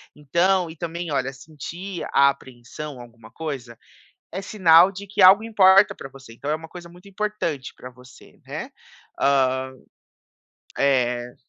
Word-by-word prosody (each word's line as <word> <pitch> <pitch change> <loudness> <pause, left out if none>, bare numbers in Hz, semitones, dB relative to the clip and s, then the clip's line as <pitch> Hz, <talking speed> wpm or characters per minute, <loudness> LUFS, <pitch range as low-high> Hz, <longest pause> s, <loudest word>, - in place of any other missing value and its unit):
Então, 170 +5 +1
e 160 - -14
também 170 -1 -5
olha, 135 -1 -1
sentir 170 +7 -8
a 140 0 +6
apreensão, 130 +1 -8
alguma 115 -2 -15
coisa, 130 -8 -7 0.5
é 190 - -5
sinal 180 -3 +5
de 200 +2 -9
que 200 +1 -2
algo 195 +4 +8
importa 195 -3 +5
pra - - -9
você, 135 -4 -14
então 140 +5 -7
é 155 - +1
uma 160 0 -11
coisa 175 0 -11
muito 180 +3 -16
importante 195 -9 -4
pra 125 - -10
você 125 0 -18
ne - - -10 0.7
ham, 130 -1 +1 1.1
eh. 125 -3 0
150 Hz, 145 wpm, -23 LUFS, 130-185 Hz, 1.1 s, algo